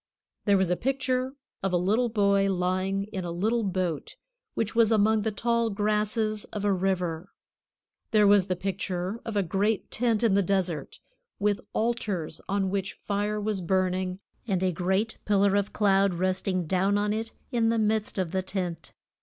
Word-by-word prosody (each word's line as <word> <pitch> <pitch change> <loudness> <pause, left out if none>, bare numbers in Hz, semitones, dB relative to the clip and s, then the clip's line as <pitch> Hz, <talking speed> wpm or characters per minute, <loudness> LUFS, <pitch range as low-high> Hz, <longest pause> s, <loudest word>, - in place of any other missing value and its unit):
There 200 -2 +4
was 190 -2 +1
a - - +3
picture 260 +2 -1 0.3
of 195 -1 -1
a - - +4
little 215 +7 +2
boy 200 -2 +3
lying 185 +2 0
in 190 - -3
a 175 - -4
little 215 +8 0
boat 185 -6 -2 0.4
which 225 -1 -1
was 230 -1 +4
among 220 0 +4
the 220 +1 -1
tall 235 +2 +1
grasses 215 +1 0
of 205 -1 -5
a 200 - +3
river. 180 -2 -1 0.8
There 215 -1 +4
was 200 -2 +5
the 185 - 0
picture 190 +2 -3
of 225 -2 -3
a 200 - +3
great 200 +4 0
tent 230 -2 +1
in 225 -4 +4
the 200 - +4
desert, 180 -6 -1 0.4
with 205 0 +1
altars 215 -8 -2
on 195 -1 0
which 195 -1 -2
fire 205 +1 -2
was 210 -2 -1
burning, 185 +1 0 0.3
and 190 -3 0
a 185 - +2
great 190 +6 -1
pillar 200 -1 +3
of 205 0 0
cloud 195 -2 +3
resting 185 0 0
down 190 +4 +2
on 210 0 +1
it 225 +1 -3 0.2
in 230 -2 +2
the 230 - +2
midst 215 -1 0
of 185 -4 -1
the 190 - 0
tent. 180 -3 -4
200 Hz, 175 wpm, -27 LUFS, 185-215 Hz, 0.8 s, was